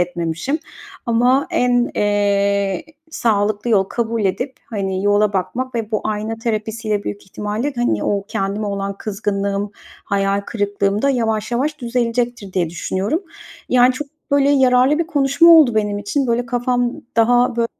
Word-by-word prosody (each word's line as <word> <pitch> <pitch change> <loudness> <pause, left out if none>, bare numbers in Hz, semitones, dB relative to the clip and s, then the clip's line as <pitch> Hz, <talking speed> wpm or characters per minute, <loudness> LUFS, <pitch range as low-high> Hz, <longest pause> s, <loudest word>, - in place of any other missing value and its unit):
etmemişim 175 - -2 0.5
ama 245 +4 +3
en, 245 -1 +2
eee, 200 +3 +1 0.3
sağlıklı 215 -2 0
yol 195 -3 +4
kabul 230 0 -2
edip, 250 +8 -1 0.2
hani, 195 -2 -2
yola 205 0 +3
bakmak 235 +8 -2
ve 225 -1 -3
bu 215 - 0
ayna 215 +1 -2
terapisiyle 220 -2 -2
büyük 205 - -5
ihtimalle, 210 +8 -3
hani, 240 0 0
o 200 -1 0
kendime 200 +2 -2
olan 200 0 -3
kızgınlığım, 200 -1 -2 0.3
hayal 200 0 0
kırıklığım 205 -1 -1
da 280 - +3
yavaş 225 -3 -1
yavaş 295 +5 -1
düzelecektir 240 -3 -2
diye 170 -3 0
düşünüyorum. 195 - -2 0.5
Yani, 250 0 +5
çok, 285 +3 -5 0.2
böyle, 280 0 +3
yararlı 265 +1 +4
bir 335 - 0
konuşma 285 0 +4
oldu 310 -9 +7
benim 210 -1 0
için. 265 +7 -1
Böyle, 240 +1 0
kafam 245 -1 0 0.2
daha, 245 +1 +3
bö 230 0 +2
220 Hz, 145 wpm, -19 LUFS, 200-250 Hz, 0.5 s, oldu